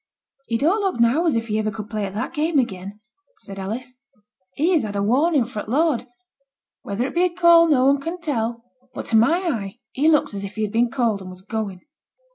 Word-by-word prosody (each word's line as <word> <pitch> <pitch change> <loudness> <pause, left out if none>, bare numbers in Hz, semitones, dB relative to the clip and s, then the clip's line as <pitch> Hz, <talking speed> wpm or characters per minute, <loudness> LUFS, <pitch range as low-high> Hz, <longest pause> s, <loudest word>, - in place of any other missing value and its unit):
'He 230 - 0
don't 335 - +2
look 385 -10 -1
now 255 +9 +3
as 315 - +2
if 230 0 -1
he 215 -1 0
iver 215 0 0
could 215 0 -7
play 210 -2 -2
at 195 - -9
that 245 +9 -3
game 315 0 0
again,' 200 -4 -2 0.4
said 195 -1 -9
Alice; 235 +6 -5 0.6
'he 320 - +2
has 330 -5 +3
had 205 -2 -5
a 200 - 0
warning 275 +5 +2
fra' 215 -3 -6
the - - -9
Lord. 290 -4 +1 0.7
Whether 210 +5 -2
it - - -5
be 350 +1 +3
a - - +2
call 340 -1 +5
no 265 -5 +3
one 275 +1 +3
can 335 +5 -5
tell. 235 -7 -2 0.3
But - - -5
to 225 - +1
my 280 +11 +4
eyne 210 - -2 0.2
he 295 +4 +2
looks 300 -7 +2
as 200 0 -5
if 200 +1 -7
he 220 - -2
had 210 - -2
been 235 +2 +2
called, 230 -5 0
and 185 - -8
was 185 0 -11
going.' 205 -3 -4
235 Hz, 235 wpm, -22 LUFS, 210-310 Hz, 0.7 s, call